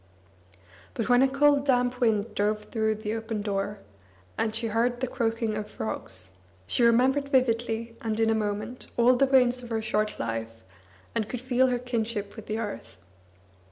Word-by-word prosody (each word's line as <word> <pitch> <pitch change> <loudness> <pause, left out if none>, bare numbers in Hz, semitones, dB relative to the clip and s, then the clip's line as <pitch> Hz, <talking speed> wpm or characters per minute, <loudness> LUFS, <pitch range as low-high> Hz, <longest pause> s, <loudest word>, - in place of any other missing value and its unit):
But 230 - -2
when 245 0 +6
a 270 - +6
cold 285 +1 +3
damp 250 -1 +2
wind 220 -3 +1
drove 210 +1 0
through 220 -1 0
the 215 0 -4
open 225 -2 -3
door, 205 0 -2 0.6
and 220 -1 0
she 230 +1 -1
heard 235 +2 +1
the 260 - 0
croaking 230 -3 -1
of 210 0 -4
frogs, 95 -4 -5 0.3
she - - 0
remembered 260 +4 +4
vividly 230 -3 +1
and 220 -1 -2
in 225 0 +3
a - - +4
moment 215 +3 -3
all 245 +2 +5
the 275 +2 +3
rains 250 -2 +4
of 240 - -10
her 225 -1 0
short 215 -1 -1
life, 115 0 -4 0.5
and 220 -2 -1
could 250 - -3
feel 255 +1 +2
her 250 -1 +1
kinship 230 -4 -3
with 220 - -10
the 215 - -2
earth. 205 - -6
225 Hz, 175 wpm, -27 LUFS, 215-245 Hz, 0.6 s, when